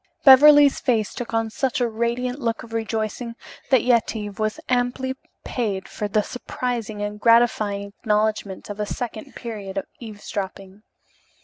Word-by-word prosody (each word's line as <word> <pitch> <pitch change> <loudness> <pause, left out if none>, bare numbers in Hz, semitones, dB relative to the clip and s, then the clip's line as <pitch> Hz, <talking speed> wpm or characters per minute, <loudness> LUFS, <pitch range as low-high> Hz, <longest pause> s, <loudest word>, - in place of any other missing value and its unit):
Beverly's 290 +1 +8
face 225 -5 0
took 245 - -6
on 225 -1 0
such 260 +2 -1
a 245 - +2
radiant 235 +3 -2
look 230 -3 -2
of 225 -1 -12
rejoicing 225 +1 -3 0.3
that 260 -4 +4
Yetive 220 -4 0
was 215 0 -1
amply 250 +1 0 0.3
paid 205 -6 -2
for 210 - -4
the 210 +1 +1
surprising 235 -4 -4
and 210 0 -4
gratifying 215 -3 +3
acknowledgment 210 -2 -1
of 205 - -8
a 210 - -1
second 225 -2 -6
period 205 -5 -6
of 195 - -2
eavesdropping. 200 -3 -7
225 Hz, 140 wpm, -23 LUFS, 210-245 Hz, 0.3 s, Beverly's